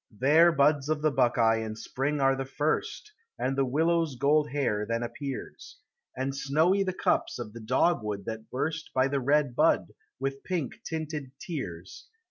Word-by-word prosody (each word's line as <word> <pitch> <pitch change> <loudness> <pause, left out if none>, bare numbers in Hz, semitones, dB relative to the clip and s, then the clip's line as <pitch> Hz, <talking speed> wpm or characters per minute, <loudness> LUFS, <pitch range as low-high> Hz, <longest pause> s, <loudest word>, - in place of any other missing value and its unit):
There 155 +6 +6
buds 145 -1 +2
of 155 -1 -1
the 155 - +3
buckeye 115 -3 +3
in 110 -1 -4
spring 135 +6 -2
are 135 0 +3
the 135 - -3
first, 285 - -2 0.3
And 135 +1 -1
the 135 - +2
willow's 160 +2 +1
gold 145 +4 +2
hair 130 -7 0
then 115 +2 -2
appears, 130 +3 -7 0.4
And 135 +1 -2
snowy 160 +8 +2
the 190 -1 0
cups 185 - 0
of 115 -4 -7
the 115 - -8
dogwood 105 - 0
that 110 -1 -6
burst 155 +4 -3
By 130 0 +4
the 140 0 0
red 140 -1 +2
bud, - - +3 0.3
with 135 +1 -3
pink 170 -9 -3
tinted 155 -4 -5
tears. 100 - -7
140 Hz, 165 wpm, -28 LUFS, 120-155 Hz, 0.4 s, There